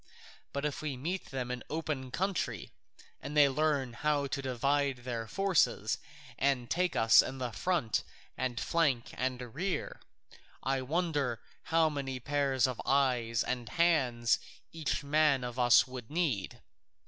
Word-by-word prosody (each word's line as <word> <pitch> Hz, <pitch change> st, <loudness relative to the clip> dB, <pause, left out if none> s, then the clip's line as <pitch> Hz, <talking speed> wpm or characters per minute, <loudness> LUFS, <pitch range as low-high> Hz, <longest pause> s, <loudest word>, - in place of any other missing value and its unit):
But 140 Hz, +1 st, -3 dB
if 150 Hz, -, -2 dB
we 145 Hz, -4 st, -3 dB
meet 175 Hz, +8 st, -3 dB
them 125 Hz, -2 st, -4 dB
in 125 Hz, -1 st, -4 dB
open 150 Hz, -4 st, -3 dB
country, 190 Hz, +7 st, -2 dB, 0.5 s
and 145 Hz, +3 st, -5 dB
they 145 Hz, -1 st, +8 dB
learn 140 Hz, -3 st, 0 dB
how 145 Hz, +2 st, 0 dB
to 140 Hz, 0 st, -3 dB
divide 135 Hz, 0 st, 0 dB
their 115 Hz, -3 st, -4 dB
forces 195 Hz, -, +1 dB, 0.4 s
and 135 Hz, -3 st, +1 dB
take 180 Hz, 0 st, +1 dB
us 115 Hz, 0 st, +7 dB
in 135 Hz, -, -5 dB
front 165 Hz, -, 0 dB, 0.3 s
and 125 Hz, -1 st, -2 dB
flank 145 Hz, -8 st, +1 dB
and 125 Hz, -2 st, -3 dB
rear, 185 Hz, +5 st, -3 dB, 0.6 s
I 135 Hz, 0 st, 0 dB
wonder 145 Hz, -4 st, -1 dB, 0.3 s
how 165 Hz, 0 st, +3 dB
many 135 Hz, -3 st, -4 dB
pairs 135 Hz, -1 st, +1 dB
of 130 Hz, -3 st, -3 dB
eyes 125 Hz, -5 st, +2 dB
and 120 Hz, -3 st, -3 dB
hands 125 Hz, -6 st, +2 dB, 0.3 s
each 160 Hz, -2 st, -2 dB
man 145 Hz, -2 st, +3 dB
of 125 Hz, 0 st, -5 dB
us 120 Hz, -1 st, +6 dB
would 125 Hz, -3 st, -9 dB
need! 150 Hz, -, -1 dB
135 Hz, 140 wpm, -31 LUFS, 125-155 Hz, 0.6 s, they